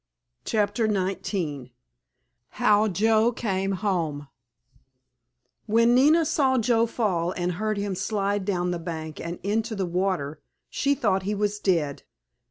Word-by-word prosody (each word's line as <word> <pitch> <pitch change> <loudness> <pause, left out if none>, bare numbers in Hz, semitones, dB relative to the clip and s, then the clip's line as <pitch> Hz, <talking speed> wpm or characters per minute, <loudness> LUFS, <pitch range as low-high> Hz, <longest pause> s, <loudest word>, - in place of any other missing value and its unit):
*CHAPTER 220 +1 +1
XIX* 185 - -2 0.9
*HOW 210 +1 +4
JOE 220 +4 +3
CAME 195 -4 -1
HOME* 165 -8 -2 1.4
When 230 +2 +4
Nina 305 +6 +5
saw 265 -3 +2
Joe 230 -1 +2
fall 185 -7 -1
and 180 0 -1
heard 215 +4 -2
him 200 -1 -2
slide 200 +1 -1
down 180 -2 -1
the 175 - -3
bank 160 -2 -6
and 170 +1 -5
into 220 +3 -1
the 195 -2 -1
water 175 -5 -2 0.3
she 280 0 +1
thought 195 -7 +1
he 205 +2 -2
was 210 0 -1
dead. 165 -8 0
200 Hz, 130 wpm, -25 LUFS, 175-220 Hz, 1.4 s, Nina